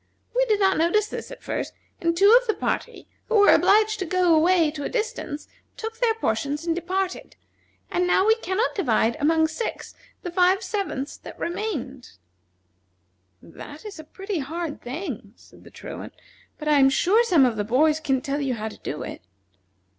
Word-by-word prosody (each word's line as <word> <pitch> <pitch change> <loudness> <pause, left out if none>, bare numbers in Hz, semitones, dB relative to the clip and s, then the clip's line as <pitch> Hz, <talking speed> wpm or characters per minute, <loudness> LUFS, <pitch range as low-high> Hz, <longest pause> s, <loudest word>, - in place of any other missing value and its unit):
We - - +3
did 425 -3 +2
not 385 -4 +3
notice 345 +6 +3
this - - -7
at - - -11
first, - - -4 0.3
and 335 -1 0
two 400 +5 +7
of - - -15
the 435 - +1
party, - - -3 0.2
who 460 - 0
were 410 -1 +7
obliged 430 +1 +4
to 375 - -2
go 360 -1 +3
away 330 0 +4
to 295 -2 -6
a - - -3
distance, 325 -10 -4 0.3
took 450 0 -6
their 460 -2 +2
portions 285 - -2
and 335 -1 0
departed, 370 +2 -3 0.6
and 360 0 +1
now 375 +2 +3
we 440 - +6
can 380 -4 -4
not 465 - +1
divide 235 - +1
among 320 +2 +3
six 455 +8 -5 0.3
the 355 - -4
five 365 +2 +3
sevenths 375 -9 -3
that - - -11
remain." 340 - -4 1.4
"That 290 - -11
is 405 -5 -8
a - - -8
pretty 385 +3 -5
hard 315 +2 -5
thing," 250 - -6
said - - -19
the - - -14
Truant, - - -9 0.4
"but 305 - -7
I 300 -1 +4
am 270 0 +6
sure 390 - +3
some 340 - +4
of 240 -3 +1
the 210 - -1
boys 300 +8 +2
can 270 -4 0
tell 280 +2 -2
you 265 -3 -1
how 220 0 -4
to - - -13
do 150 - -5
it." - - -8
340 Hz, 190 wpm, -24 LUFS, 285-405 Hz, 1.4 s, two